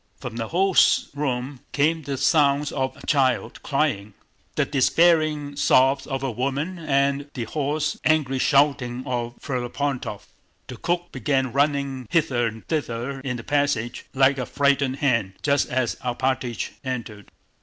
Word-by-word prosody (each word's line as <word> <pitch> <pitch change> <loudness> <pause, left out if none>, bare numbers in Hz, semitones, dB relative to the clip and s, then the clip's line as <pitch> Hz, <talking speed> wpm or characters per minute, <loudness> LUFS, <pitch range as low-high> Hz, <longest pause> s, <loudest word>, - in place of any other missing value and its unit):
From 125 -3 -7
the 115 -1 -3
host's 185 - +3
room 135 -2 -2
came 160 +3 +2
the 140 -2 -4
sounds 145 -1 +3
of 130 -2 -2
a - - -12
child 130 -4 +1
crying, 110 -9 -1 0.4
the - - +2
despairing 150 0 +2
sobs 135 -1 +3
of 135 -1 -3
a 135 - -1
woman, 140 - -2
and 140 -2 0
the 125 - -2
hoarse 150 +4 -2
angry 145 -4 +2
shouting 135 -3 +2
of 120 -2 -3
Ferapóntov. 130 -3 -3 0.4
The 125 - -9
cook 175 +6 -2
began 130 0 0
running 140 -3 0
hither 125 -7 +2
and 110 0 -8
thither 135 -3 -3
in 130 -2 -4
the 115 - -8
passage 140 -5 -1
like 135 0 +4
a 125 - -3
frightened 140 -2 +2
hen, 115 -9 0
just 140 -1 +2
as 125 -2 0
Alpátych 125 -1 -2
entered. 115 -6 -5
135 Hz, 145 wpm, -24 LUFS, 125-145 Hz, 0.4 s, like